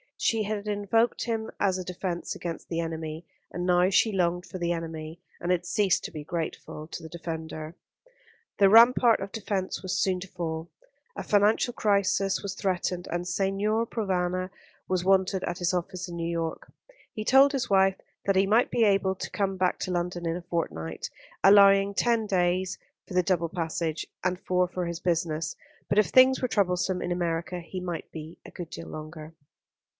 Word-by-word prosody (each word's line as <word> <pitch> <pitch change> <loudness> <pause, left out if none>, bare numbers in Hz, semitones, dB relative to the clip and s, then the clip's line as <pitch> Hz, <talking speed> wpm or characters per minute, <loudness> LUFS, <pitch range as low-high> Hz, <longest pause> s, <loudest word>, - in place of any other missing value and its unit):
She 225 -2 +1
had 210 0 -3
invoked 210 +3 +1
him 225 -2 -2
as 190 -2 +2
a 185 - -4
defence 180 -1 -4
against 170 -2 -6
the 165 - -2
enemy; 160 0 -4 0.3
and 175 0 -3
now 180 0 +4
she 220 +3 +4
longed 180 -2 0
for - - -7
the 170 0 0
enemy, 165 -1 -5 0.2
and 175 - -1
had 180 -1 +1
ceased 195 0 +2
to - - -5
be 150 - -7
grateful 155 -1 -5
to - - -7
the 160 - -8
defender. 160 -1 -6 0.8
The 195 -1 +6
rampart 235 +2 +7
of 195 +1 -6
defence 195 -3 -3
was 185 -1 -2
soon 185 -2 +1
to 195 - -7
fall. 165 -2 -4 0.5
A - - -5
financial 210 +4 +3
crisis 200 -2 +1
was 195 -2 -5
threatened, 180 -2 -2
and 175 +1 -2
Signor 205 +4 0
Provana 185 -4 -1 0.4
was 185 -1 0
wanted 190 0 +2
at 175 - -3
his 175 +1 0
office 180 +1 -3
in 175 - -7
New 170 0 -2
York. 165 -1 -4 0.4
He 215 - -4
told 270 +5 +6
his 265 -4 -2
wife 195 -1 +4 0.3
that 195 - +2
he 190 +1 +4
might 225 +4 +4
be 235 - +2
able 195 -2 +3
to - - -5
come 195 -2 -1
back 185 0 +1
to 185 - -3
London 175 -1 -2
in 165 - 0
a 180 - -5
fortnight, 80 - -3 0.3
allowing 195 0 +7
ten 230 +1 +2
days 185 -1 +1 0.3
for - - -9
the 180 - +4
double 170 -3 +1
passage, 165 -2 -2 0.2
and 180 0 0
four 180 -1 +1
for 180 0 -3
his 170 -1 -4
business; 165 -2 -1 0.3
but 205 - +3
if 210 - +4
things 260 0 +5
were 255 - +1
troublesome 185 -4 0
in 175 - -3
America 175 0 -2
he 175 +2 -7
might 175 -2 -5
be 160 +1 -9
a - - -11
good 175 -3 -7
deal 165 0 -8
longer. 155 +1 -8
180 Hz, 185 wpm, -27 LUFS, 170-200 Hz, 0.8 s, rampart